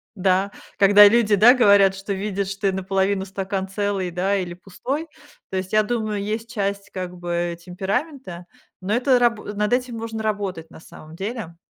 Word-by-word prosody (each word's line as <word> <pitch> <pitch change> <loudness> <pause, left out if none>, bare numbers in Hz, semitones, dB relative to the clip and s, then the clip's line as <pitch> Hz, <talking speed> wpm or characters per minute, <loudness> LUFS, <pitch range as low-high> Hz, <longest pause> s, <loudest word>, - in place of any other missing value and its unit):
да, 190 +1 +1 0.3
когда 205 +1 +8
люди, 230 -2 +2
да, 230 +6 +7
говорят, 200 -5 +5
что 195 +1 -4
видят, 200 0 -3
что 195 +1 -2
и - - +2
наполовину 190 +1 -1
стакан 195 0 -4
целый, 195 -2 -2
да, 190 +3 0
или 175 -2 -4
пустой. 260 - -5 0.4
То 190 - -3
есть, 185 +2 -5
я 215 - +5
думаю, 215 -2 -2
есть 220 +3 -4
часть, 200 -2 -3
как 180 -1 -6
бы, 175 -1 -3
темперамента, 190 - -4 0.4
но 195 +3 -2
это 255 +2 +3
рабу 235 -3 +1
над 210 +2 -1
этим 250 -2 -1
можно 225 -1 -5
работать 200 -6 -3
на - - -14
самом 155 0 -13
деле. 195 -2 -5
200 Hz, 175 wpm, -22 LUFS, 190-215 Hz, 0.4 s, когда